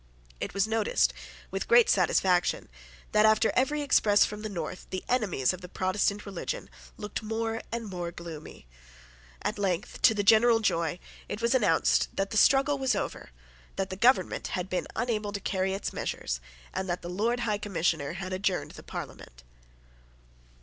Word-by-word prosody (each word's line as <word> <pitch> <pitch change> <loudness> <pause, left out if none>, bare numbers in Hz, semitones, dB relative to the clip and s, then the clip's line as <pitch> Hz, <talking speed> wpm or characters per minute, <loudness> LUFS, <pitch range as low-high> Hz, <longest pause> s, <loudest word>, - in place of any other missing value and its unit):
It - - -5
was 200 +1 +2
noticed, 205 - +2 0.4
with 195 +1 -3
great 240 -1 +6
satisfaction, 180 -1 +2 0.4
that, 210 0 +4
after 220 +1 +4
every 290 +3 +1
express 210 -7 +4
from 210 0 -6
the 215 - -4
North, 180 -2 -6
the 185 - -4
enemies 195 - +1
of 185 - -8
the 180 - -9
Protestant 200 +3 0
religion 200 - -5 0.3
looked 210 +2 -5
more 225 +1 -2
and 230 0 -3
more 175 -3 -4
gloomy. 165 - -9 0.8
At - - -2
length, 190 -2 -2
to 220 - +6
the 205 - 0
general 225 +2 +6
joy, 170 -6 0 0.3
it 205 - -4
was 235 +1 +1
announced 210 -11 +3
that 195 0 -1
the 220 - -1
struggle 275 +4 +4
was 265 -1 +1
over, - - -4 0.5
that 195 -1 -2
the - - -3
government 245 +7 +2
had 180 +1 -4
been 185 - -1
unable 220 -3 -1
to 200 - -3
carry 190 -1 -1
its 200 - -4
measures, - - -3 0.3
and 190 0 -3
that 175 - -2
the - - -5
Lord 225 +7 0
High 210 -3 0
Commissioner 165 -7 -1
had 185 +1 -5
adjourned 190 0 -1
the - - -11
Parliament. - - -9
200 Hz, 170 wpm, -28 LUFS, 180-225 Hz, 0.8 s, great